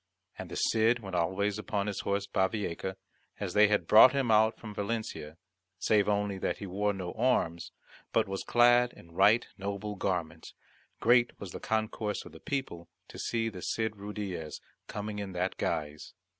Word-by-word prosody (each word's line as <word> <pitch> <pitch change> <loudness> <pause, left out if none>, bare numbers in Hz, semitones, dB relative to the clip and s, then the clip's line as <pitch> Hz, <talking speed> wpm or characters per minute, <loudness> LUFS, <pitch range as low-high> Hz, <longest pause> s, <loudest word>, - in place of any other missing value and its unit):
And - - -8
the - - -6
Cid 115 +2 +3
went 95 -5 -7
alway 95 +4 +1
upon 105 -1 -2
his 105 -2 -3
horse 100 0 -1
Bavieca, 95 -1 -1 0.4
as 100 -4 -3
they 105 0 +6
had 105 0 +1
brought 110 +5 +8
him 135 -4 +1
out 110 +1 +4
from 105 -2 -9
Valencia, 100 -7 -4 0.4
save 105 +3 +2
only 100 -1 0
that - - -1
he 100 - -7
wore 100 +2 0
no 95 -3 -5
arms, 85 -10 0 0.4
but - - +2
was 95 0 -3
clad 120 0 +4
in 85 - -16
right 100 +7 +4
noble 100 +1 -4
garments, 85 -4 -3 0.5
Great 120 +1 +4
was 100 -3 -7
the - - -7
concourse 110 -1 -2
of - - -12
people 130 - -4 0.2
to - - -10
see 115 -1 -1
the 95 -5 -6
Cid 110 +2 -2
Ruydiez 100 -6 -5 0.3
coming 105 0 -5
in 100 -2 -5
that 90 +1 -2
guise. 75 0 -3
100 Hz, 170 wpm, -30 LUFS, 95-110 Hz, 0.5 s, brought